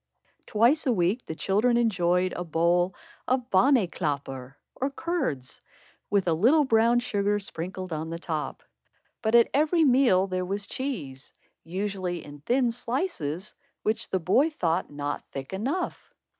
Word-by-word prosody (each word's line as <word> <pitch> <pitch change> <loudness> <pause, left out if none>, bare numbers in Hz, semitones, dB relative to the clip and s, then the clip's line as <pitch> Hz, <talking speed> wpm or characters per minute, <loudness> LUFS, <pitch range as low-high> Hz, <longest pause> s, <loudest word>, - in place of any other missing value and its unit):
Twice 245 +8 +3
a - - +4
week 195 +3 0
the 160 - -4
children 215 +8 +2
enjoyed 185 -5 +2
a 175 - -3
bowl 175 +2 +1 0.3
of 255 -1 0
bonnyclabber 155 - +1 0.2
or 270 - -2
curds, 275 - -3 0.5
with 200 -3 +1
a 170 - +3
little 250 - +4
brown 230 0 +4
sugar 205 -3 0
sprinkled 185 -2 -5
on 155 +1 -4
the 165 - -4
top. 160 -3 -4 0.6
But 220 0 +2
at 235 -1 +6
every 315 +4 +3
meal 250 -9 +4
there 185 -1 -2
was 200 +2 -3
cheese, 150 - -5 0.3
usually 185 -1 -3
in 145 0 -11
thin 245 - +1
slices, 230 - -3 0.3
which 220 +2 0
the 190 - 0
boy 225 - +3
thought 175 - -1
not 145 0 -4
thick 135 +5 -7
enough. 275 - -3
195 Hz, 145 wpm, -27 LUFS, 170-245 Hz, 0.6 s, at